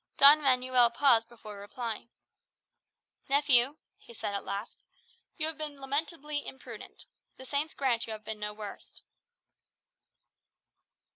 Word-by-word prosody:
Don 290 +2 +9
Manuel 255 -3 +4
paused 235 -2 +3
before 215 -3 -11
replying. 230 +2 -5 1.2
"Nephew," 280 -1 +4 0.2
he 235 - -15
said 205 - -4
at 200 - -3
length, 200 +3 -5 0.6
"you 310 - 0
have 320 -1 -4
been 300 -2 -6
lamentably 290 +2 -3
imprudent. 265 - -9 0.3
The 260 - -10
saints 290 +4 -2
grant 245 -5 0
you 220 - -4
have 215 -1 -10
been 220 -1 -5
no 210 0 -3
worse." 210 -1 -9
255 Hz, 125 wpm, -30 LUFS, 220-285 Hz, 1.2 s, Don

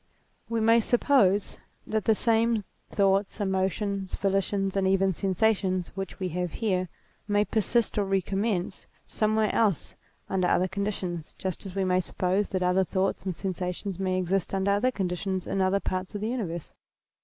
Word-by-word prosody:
We 230 -1 0
may 230 +1 +5
suppose 225 -4 +2 0.3
that 220 -1 -1
the 220 - +4
same 230 -1 +2 0.3
thoughts, 195 +1 +1
emotions, 195 0 -1
volitions 195 0 0
and 195 -1 +2
even 195 0 +3
sensations 190 -1 +1
which 195 -1 -5
we 185 -1 -1
have 180 0 -3
here, 185 -5 0 0.4
may 205 0 +2
persist 225 +1 +1
or 200 - +1
recommence 195 0 -1 0.2
somewhere 215 0 +1
else 205 -8 +1 0.3
under 185 -2 +1
other 185 +1 +3
conditions, 190 -4 -4
just 190 +1 -4
as 185 - -9
we 195 -1 +1
may 185 0 +3
suppose 185 +2 0
that 185 -1 -1
other 180 +1 +3
thoughts 190 +1 -1
and 185 - -2
sensations 185 +1 -4
may 185 -1 0
exist 185 +1 0
under 195 +1 +1
other 205 +6 +3
conditions 190 -3 -2
in 195 - -1
other 190 +1 +2
parts 185 0 -3
of 205 - -3
the 215 - -1
universe. 180 -10 -4
195 Hz, 160 wpm, -27 LUFS, 185-210 Hz, 0.4 s, may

